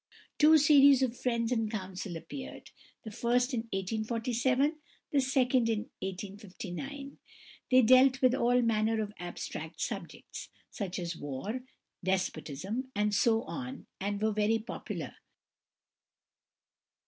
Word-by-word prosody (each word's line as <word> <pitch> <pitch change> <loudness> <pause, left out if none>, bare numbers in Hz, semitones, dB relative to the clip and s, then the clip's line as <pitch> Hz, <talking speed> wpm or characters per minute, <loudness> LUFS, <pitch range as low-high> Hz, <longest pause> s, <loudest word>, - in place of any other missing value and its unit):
Two 315 +1 +8
series 280 -3 +6
of 245 -2 0
"Friends 235 -2 -1
in 225 -3 +1
Council" 185 -4 -5
appeared, 260 - -9 0.3
the 220 - -7
first 245 +4 +1
in 230 -1 -2
1847, 235 - 0 0.3
the 285 - +3
second 255 -3 +2
in 220 -2 +1 0.2
1859. 205 +8 -7 0.5
They 255 -1 +6
dealt 255 +3 +6
with 255 -2 +4
all 245 -1 +3
manner 225 0 +1
of 210 -1 -3
abstract 175 0 -6
subjects, - - -6 0.2
such 190 -4 -4
as 175 -2 -3
"war," 145 - -4 0.4
"despotism," 190 - -2
and 210 0 +1
so 225 +3 +3
on, 265 0 -6
and 200 +1 -2
were 220 +1 +1
very 215 +2 +2
popular. 225 +2 -6
230 Hz, 120 wpm, -31 LUFS, 205-255 Hz, 0.5 s, Two